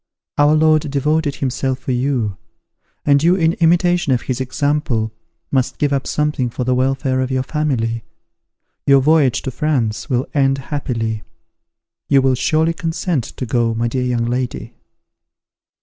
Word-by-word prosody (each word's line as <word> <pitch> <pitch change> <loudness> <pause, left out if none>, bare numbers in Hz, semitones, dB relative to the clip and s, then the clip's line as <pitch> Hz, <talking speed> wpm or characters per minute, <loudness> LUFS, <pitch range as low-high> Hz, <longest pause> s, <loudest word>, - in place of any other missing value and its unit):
Our 145 +1 +5
Lord 155 -1 +3
devoted 145 +1 0
himself 130 0 -1
for 130 0 -4
you; 125 -5 0 0.7
and 140 -1 +4
you 170 +3 +4
in 165 -3 +2
imitation 175 -1 +3
of 125 -2 +1
his 130 0 -3
example, 130 -4 -1 0.4
must 130 -2 0
give 145 -1 +1
up 135 -1 -1
something 150 -4 0
for 125 - -4
the 130 +1 +1
welfare 130 +1 0
of 130 - -1
your 130 -1 0
family. 125 -7 -1 0.8
Your 140 -1 +6
voyage 145 -3 +3
to 130 - -3
France 125 -8 -1
will 125 0 +1
end 135 -2 +2
happily. 120 -6 -3 0.9
You 135 -2 +4
will 135 -1 +3
surely 160 +6 +1
consent 165 -4 -2
to 130 - -6
go, 115 -1 0
my 115 +1 0
dear 125 +2 -2
young 120 -2 0
lady." 125 +1 -3
135 Hz, 150 wpm, -18 LUFS, 125-150 Hz, 0.9 s, Your